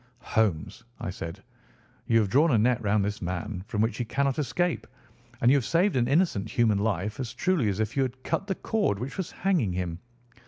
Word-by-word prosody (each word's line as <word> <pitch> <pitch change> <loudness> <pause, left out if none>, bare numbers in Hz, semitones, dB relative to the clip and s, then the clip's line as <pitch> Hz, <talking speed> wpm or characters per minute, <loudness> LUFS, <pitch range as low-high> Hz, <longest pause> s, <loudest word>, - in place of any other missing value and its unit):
"Holmes," 110 +2 0 0.2
I - - -3
said, 85 -2 -7 0.6
"you 115 - +4
have 105 - -1
drawn 150 +6 +5
a 120 - +4
net 120 +2 +2
round 105 -1 +2
this 105 +1 -3
man 90 +2 -4
from 105 - -1
which 110 0 0
he - - +1
cannot 140 +4 0
escape, 175 +4 -1 0.5
and 120 - +5
you 140 - +6
have 135 - 0
saved 175 - +2
an 120 -2 +2
innocent 135 - +1
human 110 -4 +2
life 105 +1 -1
as 125 -1 -4
truly 160 - +1
as 100 +1 -2
if 110 0 -1
you 135 - +2
had 130 0 -3
cut 195 - -1
the 190 - -1
cord 210 - 0
which 125 +6 -5
was 190 -3 -3
hanging 175 - 0
him. 90 -2 -3
115 Hz, 210 wpm, -27 LUFS, 100-140 Hz, 0.6 s, you